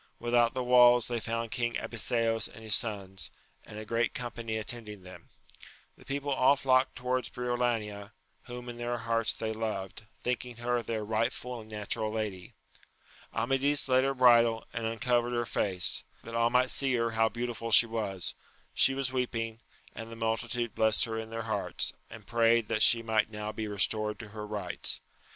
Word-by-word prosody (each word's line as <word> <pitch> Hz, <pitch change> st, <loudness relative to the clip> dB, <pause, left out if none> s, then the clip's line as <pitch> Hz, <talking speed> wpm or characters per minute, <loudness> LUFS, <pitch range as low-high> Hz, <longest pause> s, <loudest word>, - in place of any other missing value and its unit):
Without 120 Hz, 0 st, +2 dB
the 130 Hz, -, -1 dB
walls 125 Hz, -1 st, +6 dB
they 120 Hz, -1 st, -2 dB
found 115 Hz, 0 st, -3 dB
King 120 Hz, -1 st, -1 dB
Abiseos 115 Hz, -1 st, +1 dB
and 110 Hz, -, -13 dB
his 110 Hz, -1 st, +3 dB
sons, 100 Hz, -4 st, 0 dB, 0.3 s
and 105 Hz, -, -11 dB
a 110 Hz, -, -6 dB
great 115 Hz, +1 st, 0 dB
com 120 Hz, -1 st, -4 dB
pany 115 Hz, -2 st, -4 dB
attending 105 Hz, -3 st, -5 dB
them: 90 Hz, 0 st, -13 dB, 0.7 s
the -, -, -18 dB
people 140 Hz, +1 st, -3 dB
all 130 Hz, +1 st, +5 dB
flocked 130 Hz, -1 st, +2 dB
towards 125 Hz, 0 st, -1 dB
Briolania, 120 Hz, -4 st, -2 dB, 0.3 s
whom 125 Hz, 0 st, -8 dB
in 120 Hz, -1 st, -7 dB
their 120 Hz, 0 st, -2 dB
hearts 115 Hz, -1 st, 0 dB
they 110 Hz, 0 st, -3 dB
loved, 110 Hz, -2 st, -4 dB, 0.2 s
thinking 125 Hz, 0 st, -2 dB
her 120 Hz, 0 st, 0 dB
their 110 Hz, -2 st, -3 dB
rightful 115 Hz, +2 st, -2 dB
and 110 Hz, -, -14 dB
natural 105 Hz, 0 st, -2 dB
lady. 105 Hz, -5 st, -4 dB, 0.8 s
Amadis 135 Hz, +6 st, +2 dB
led 130 Hz, 0 st, +4 dB
her 135 Hz, 0 st, 0 dB
bridle, 120 Hz, -3 st, +5 dB
and 115 Hz, -1 st, -2 dB
uncovered 120 Hz, +1 st, 0 dB
her 120 Hz, 0 st, 0 dB
face,* 95 Hz, -5 st, 0 dB, 0.2 s
that 115 Hz, -, -9 dB
all 115 Hz, 0 st, +3 dB
might 125 Hz, +1 st, +3 dB
see 135 Hz, -2 st, +2 dB
her 115 Hz, -1 st, 0 dB
how 115 Hz, 0 st, +2 dB
beautiful 120 Hz, -1 st, -4 dB
she 115 Hz, +2 st, +7 dB
was: 105 Hz, -5 st, -3 dB, 0.4 s
she 135 Hz, -, +4 dB
was 135 Hz, -1 st, -1 dB
weeping, 115 Hz, -3 st, -2 dB, 0.3 s
and 115 Hz, 0 st, -8 dB
the -, -, -7 dB
multitude 115 Hz, +1 st, -2 dB
blessed 110 Hz, 0 st, +2 dB
her 115 Hz, -1 st, -4 dB
in 110 Hz, 0 st, -6 dB
their 115 Hz, 0 st, -4 dB
hearts, 110 Hz, -3 st, -1 dB, 0.2 s
and 110 Hz, -2 st, -11 dB
prayed 115 Hz, -1 st, +3 dB
that 110 Hz, -1 st, 0 dB
she 115 Hz, +1 st, +5 dB
might 110 Hz, -1 st, +1 dB
now 105 Hz, 0 st, -5 dB
be 110 Hz, 0 st, -4 dB
restored 105 Hz, +1 st, 0 dB
to 110 Hz, -, -9 dB
her 105 Hz, 0 st, -7 dB
rights. 105 Hz, -4 st, -2 dB
115 Hz, 175 wpm, -30 LUFS, 110-120 Hz, 0.8 s, she